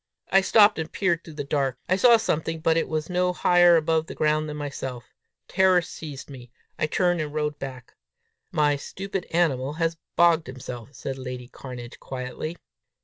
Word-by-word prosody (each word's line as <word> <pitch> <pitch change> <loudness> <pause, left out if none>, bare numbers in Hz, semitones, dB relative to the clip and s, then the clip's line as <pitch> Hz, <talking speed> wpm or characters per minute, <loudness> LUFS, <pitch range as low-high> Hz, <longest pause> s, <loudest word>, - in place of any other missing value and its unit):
I 195 - +6
stopped, 205 0 +5
and 160 0 -4
peered 170 -4 0
through 160 - -11
the 145 - -3
dark. 135 -3 -1
I 185 - +3
saw 235 +4 +6
something, 165 -5 -1
but 160 +1 +2
it 165 - +1
was 155 0 -2
no 180 0 +1
higher 175 -1 +5
above 160 0 +1
the - - -8
ground 155 0 +1
than 150 - -5
myself. 135 -4 -6 0.3
Terror 185 -1 +4
seized 150 -5 -8
me. 125 -4 -11 0.3
I 155 - +1
turned 175 +1 +1
and 150 -1 -4
rode 150 -1 -2
back. 130 -3 -8 0.6
"My 145 -1 +2
stupid 195 +5 -5
animal 145 -5 +1
has 165 +1 -1 0.2
bogged 170 -2 +4
himself!" 125 -3 -8
said 135 -1 -5
lady 125 -1 -6
Cairnedge 125 -3 -9
quietly. 130 +6 -6
155 Hz, 175 wpm, -25 LUFS, 135-175 Hz, 0.6 s, I